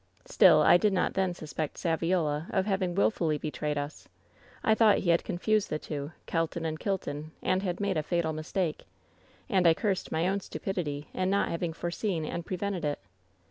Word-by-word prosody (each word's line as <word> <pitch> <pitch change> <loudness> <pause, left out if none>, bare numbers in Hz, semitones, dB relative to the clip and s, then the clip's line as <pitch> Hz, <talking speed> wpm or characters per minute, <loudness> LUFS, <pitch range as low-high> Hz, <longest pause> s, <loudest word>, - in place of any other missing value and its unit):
Still, 185 - +6
I 175 - +7
did 205 +2 +2
not 180 - +1
then 190 -2 0
suspect 155 -1 -5
Saviola 165 -2 0
of 190 -2 +1
having 190 -3 0
wilfully 170 -6 +2
betrayed 150 0 -3
us. 145 +1 -5 0.6
I 220 - +4
thought 220 -1 +5
he 175 - +2
had 170 - +3
confused 210 +4 0
the 150 - -1
two 145 -1 -5
— - - -38
^Kelton 165 0 -1
and 155 -1 -3
Kilton 155 -6 -3
— - - -35
and 185 - +1
had 180 -3 -2
made 200 -4 0
a - - +2
fatal 165 0 -1
mistake. 155 +1 -2 0.6
And 185 -3 +3
I 165 - +6
cursed 195 -1 -1
my 160 +1 0
ovni 195 +2 +1
stupidity 150 -8 -4
in 185 0 0
not 200 +1 +2
having 170 0 -2
foreseen 175 0 -2
and 170 +2 -4
prevented 185 0 -3
it. 145 -1 0
175 Hz, 190 wpm, -29 LUFS, 155-190 Hz, 0.6 s, I